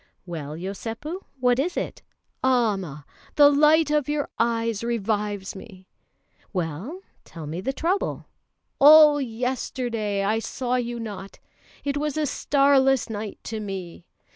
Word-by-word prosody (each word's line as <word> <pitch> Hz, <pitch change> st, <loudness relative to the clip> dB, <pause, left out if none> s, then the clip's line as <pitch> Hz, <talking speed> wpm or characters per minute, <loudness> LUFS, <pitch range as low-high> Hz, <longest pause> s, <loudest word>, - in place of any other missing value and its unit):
"Well, 155 Hz, -5 st, -6 dB
Yosépu, 225 Hz, -, -6 dB
what 250 Hz, 0 st, +3 dB
is 340 Hz, +6 st, -1 dB
it?" -, -, -4 dB, 0.4 s
"Amma! 200 Hz, -, 0 dB, 0.3 s
the 290 Hz, -1 st, +7 dB
light 300 Hz, +1 st, +4 dB
of 295 Hz, -2 st, +1 dB
your 295 Hz, -1 st, -1 dB
eyes 230 Hz, -2 st, 0 dB
revives 210 Hz, -4 st, -2 dB
me!" 190 Hz, -2 st, -12 dB, 0.7 s
"Well, 185 Hz, -, -4 dB, 0.2 s
tell 165 Hz, -3 st, -10 dB
me 160 Hz, +5 st, -5 dB
the 265 Hz, -, -1 dB
trouble." 340 Hz, +8 st, -1 dB, 0.5 s
"All 295 Hz, 0 st, +8 dB
yesterday 235 Hz, -4 st, -2 dB
I 215 Hz, +3 st, +1 dB
saw 250 Hz, +2 st, -3 dB
you 240 Hz, -1 st, -3 dB
not; 200 Hz, -4 st, -7 dB, 0.5 s
it 285 Hz, 0 st, -1 dB
was 300 Hz, 0 st, -2 dB
a 310 Hz, -, +1 dB
starless 275 Hz, -3 st, +3 dB
night 210 Hz, -1 st, -5 dB
to 220 Hz, -1 st, -5 dB
me!" 190 Hz, -4 st, -7 dB
230 Hz, 130 wpm, -24 LUFS, 200-280 Hz, 0.7 s, All